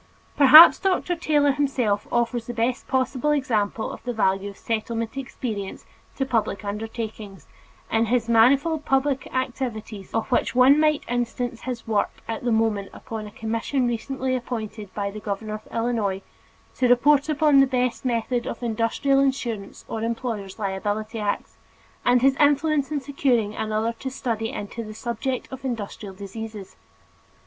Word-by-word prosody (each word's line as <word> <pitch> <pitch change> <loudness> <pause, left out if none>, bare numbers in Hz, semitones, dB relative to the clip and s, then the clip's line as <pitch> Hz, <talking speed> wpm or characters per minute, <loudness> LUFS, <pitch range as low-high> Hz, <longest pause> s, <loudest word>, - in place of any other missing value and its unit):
Perhaps 300 +4 +10
Dr. 365 -2 0
Taylor 295 -4 +2
himself 260 -7 0
offers 240 -1 0
the 240 - -5
best 240 +2 -1
possible 260 +2 0
example 225 -7 0
of - - -10
the 245 - -3
value 195 -2 +1
of 200 - -12
Settlement 225 +1 -3
experience 230 -6 -5 0.3
to 270 - -1
public 220 -5 -1
undertakings, 210 -3 -6 0.5
in 225 +1 +3
his 235 0 +1
manifold 275 +7 +4
public 270 0 0
activities 235 -6 -4
of 225 +1 -2
which 245 - +1
one 260 +4 +6
might 305 -1 +2
instance 240 0 -2
his 250 -2 -5
work 215 -2 +1 0.2
at 225 +1 -4
the 240 - 0
moment 220 -3 +1
upon 220 -3 -7
a - - -11
commission 230 +4 -1
recently 255 +2 -2
appointed 220 -5 -5
by 200 -1 -2
the 215 - -7
governor 210 +1 -4
of 215 0 -8
Illinois 225 -5 -1 0.5
to 255 - +1
report 280 +4 +4
upon 300 -2 +4
the 270 - +6
best 250 -1 -1
method 240 0 -1
of 235 - -5
Industrial 235 +4 +1
Insurance 245 -7 -2
or 220 - -4
Employer's 225 -4 -3
Liability 210 +2 -3
Acts, 205 -1 -3 0.5
and 245 0 +3
his 270 0 +5
influence 290 0 +2
in 295 -2 -1
securing 255 -6 0
another 220 +1 -1
to 265 - -4
study 230 -4 -3
into 205 +3 -6
the 215 -1 -9
subject 240 +3 -3
of 265 0 -8
Industrial 210 -5 -5
Diseases. 205 +1 -8
235 Hz, 155 wpm, -24 LUFS, 215-265 Hz, 0.5 s, Perhaps